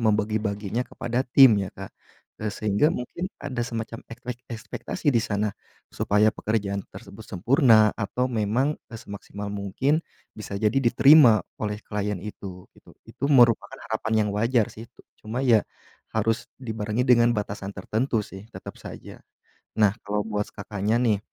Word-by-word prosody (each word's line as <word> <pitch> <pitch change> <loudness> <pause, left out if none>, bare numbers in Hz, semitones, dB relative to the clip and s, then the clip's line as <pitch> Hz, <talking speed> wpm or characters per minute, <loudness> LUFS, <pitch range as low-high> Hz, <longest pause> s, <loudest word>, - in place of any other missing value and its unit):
membagi-baginya 105 -1 0
kepada 120 0 -2
tim 120 -5 +7
ya 95 - -3
Kak, 95 0 -9 0.5
eee, 110 - -1
sehingga 105 +6 +1
mungkin 170 +9 -4
ada 135 -3 -4
semacam 115 -1 -5
ekpek 120 +1 -7
ekspektasi 115 +8 -6
di 115 - +4
sana 105 0 -1 0.4
supaya 105 +1 +2
pekerjaan 100 -2 -2
tersebut - - -11
sempurna 110 - +5
atau 120 +4 -1
memang, 125 +5 0 0.2
e - - -9
semaksimal 100 0 -7
mungkin 115 - 0 0.3
bisa 105 -2 -6
jadi 105 0 +2
diterima 125 -1 +6 0.2
oleh 105 -1 -2
klien 105 -1 -2
itu 95 -2 -8
gitu, - - -19 0.2
itu 140 - -6
merupakan 120 -5 +4
harapan 110 -1 0
yang - - -2
wajar 115 +1 +2
sih, 110 - -10
tu - - -21 0.2
cuma 115 +5 -3
ya 115 -4 +5 0.5
harus 115 +2 0 0.2
dibarengi 110 0 -2
dengan 120 -2 +4
batasan 100 -2 -4
tertentu 110 +4 -1
sih, 95 0 -11
tetap - - -9
saja. - - -10 0.6
Nah 105 0 +4
kalau 105 0 -1
buat 105 -1 -1
Kakaknya 105 +3 -1
nih 110 -5 +2
110 Hz, 145 wpm, -25 LUFS, 105-120 Hz, 0.6 s, tim